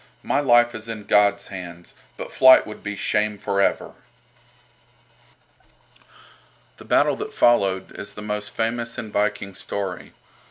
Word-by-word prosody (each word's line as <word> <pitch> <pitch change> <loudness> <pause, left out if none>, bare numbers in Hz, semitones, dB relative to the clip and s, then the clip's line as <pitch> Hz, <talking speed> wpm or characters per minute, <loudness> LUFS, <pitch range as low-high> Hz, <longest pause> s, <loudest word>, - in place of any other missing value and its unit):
My - - 0
life 120 -3 +4
is 110 0 -8
in 110 -2 -6
God's 100 0 +2
hands, 85 -3 -9 0.2
but - - -7
flight 130 0 +7
would 105 - -10
be 105 0 -5
shame 105 +1 -1
for 100 -1 -1
ever." - - 0 2.8
The - - -14
battle - - +3
that - - -7
followed 100 -6 +2
is 100 0 -6
the 105 - -8
most 105 0 -4
famous 115 +2 -3
in 110 -3 -6
Viking 105 -1 -1
story. 95 -2 -5
105 Hz, 135 wpm, -22 LUFS, 100-115 Hz, 2.8 s, flight